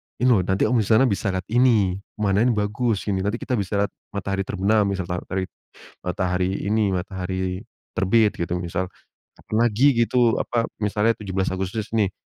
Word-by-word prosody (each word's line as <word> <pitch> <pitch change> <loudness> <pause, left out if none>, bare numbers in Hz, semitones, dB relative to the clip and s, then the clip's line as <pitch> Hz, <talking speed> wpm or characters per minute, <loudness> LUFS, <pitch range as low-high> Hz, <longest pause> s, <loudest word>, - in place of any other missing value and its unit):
"Ini 125 +1 +2
loh, 110 - +5
nanti 95 +1 +1
kamu 125 - +3
di 105 - 0
sana 110 +3 +5
bisa 100 +1 -1
lihat 95 -1 -1
ini, 110 -7 +3 0.2
pemandangannya 105 +3 +2
bagus, 105 +1 0
gini. 100 -2 -1
Nanti 100 +4 -1
kita 120 0 -2
bisa 100 +1 0
lihat 100 - -3 0.2
matahari 100 0 -2
terbenam," 100 +1 +2
misal, 95 -1 -1
ta 90 - -1
tari 95 0 -1 0.6
matahari 90 0 0 0.2
ini, 105 -2 +2
"matahari 95 0 -3 0.3
terbit." 105 +2 +3
Gitu, 85 0 -2
misal. 85 +1 -2 0.5
"Kapan 110 - -5
lagi" 120 +4 +3 0.2
gitu, 120 -1 +2
apa, 115 -1 -1
misalnya 105 +2 +1
17 95 -2 -2
Agustus, 95 +3 -3
nih, 100 -3 +1
100 Hz, 170 wpm, -23 LUFS, 95-110 Hz, 0.6 s, loh